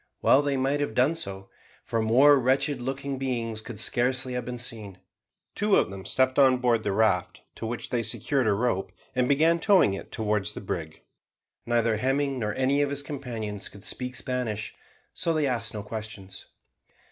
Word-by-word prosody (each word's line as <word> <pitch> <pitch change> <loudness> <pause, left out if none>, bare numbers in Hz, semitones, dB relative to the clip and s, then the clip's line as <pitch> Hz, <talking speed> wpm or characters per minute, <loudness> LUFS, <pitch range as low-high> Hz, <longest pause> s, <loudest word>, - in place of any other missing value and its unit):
Well 140 - +6
they 140 -1 0
might 135 +2 +1
have 145 -7 -2
done 130 +6 +3
so; 95 -11 -5 0.3
for 115 - -1
more 135 +6 +6
wretched 130 +1 +1
looking 135 +1 -4
beings 115 -4 -2
could 110 -1 -8
scarcely 125 +3 +1
have 125 -1 -3
been 125 +1 -5
seen. 110 -5 -3 0.6
Two 205 0 +2
of - - +2
them 95 -1 -8
stepped 130 +5 +1
on 130 -2 +6
board 120 -3 +1
the 100 - 0
raft, 95 -4 +1
to 115 - -6
which 120 +1 -5
they 120 - +1
secured 135 +2 -1
a 105 - +4
rope, 100 -4 -1 0.2
and 125 -1 +1
began 160 +4 +4
towing 185 - +4
it 95 - -7
towards 105 -3 -1
the - - -6
brig. 80 -1 -5 0.6
Neither 115 -2 +2
Hemming 135 +2 0
nor 105 -2 -2
any 135 +2 +2
of 145 - +1
his 140 0 -2
companions 115 -8 -5
could 100 - -13
speak 125 +3 -3
Spanish, 115 -2 -3 0.4
so 165 - 0
they 155 -2 +1
asked 115 -4 -1
no 105 - -4
questions. 105 -3 -8
125 Hz, 180 wpm, -27 LUFS, 110-135 Hz, 0.6 s, Well